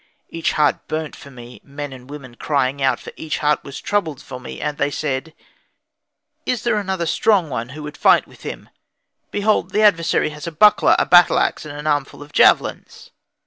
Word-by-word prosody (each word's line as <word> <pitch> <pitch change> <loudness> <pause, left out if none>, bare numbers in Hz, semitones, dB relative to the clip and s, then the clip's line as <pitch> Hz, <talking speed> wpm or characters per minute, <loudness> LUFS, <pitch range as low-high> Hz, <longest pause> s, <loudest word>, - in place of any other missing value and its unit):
Each 165 0 -1
heart 150 -1 +1
burnt 155 -1 -4
for 140 - -13
me, 120 -2 -12
men 140 0 -7
and 130 0 -13
women 140 -4 -10
crying 140 +1 -1
out; 130 -2 +2
for - - -10
each 155 -3 -3
heart 150 0 +1
was 140 - -8
troubled 170 -9 -2
for 130 -1 -9
me, 125 - -9
and 150 0 -4
they 145 - +1
said, 145 +2 -4 1.1
"Is 250 -6 -2
there 235 -3 +1
another 190 -4 -2
strong 180 -1 +2
one 120 -1 -4
who 150 +3 -9
would 150 0 -8
fight - - +4
with - - -18
him? - - -8 0.6
Behold 210 +1 +1
the 215 - +1
adversary 165 -6 +3
has 150 +3 -8
a - - -3
buckler, 210 +7 +5
a - - +2
battle 175 -1 +6
axe, - - 0
and 145 -1 -8
an 150 - -8
armful 145 -1 -1
of 145 - -18
javelins." - - +2
150 Hz, 195 wpm, -20 LUFS, 140-170 Hz, 1.1 s, battle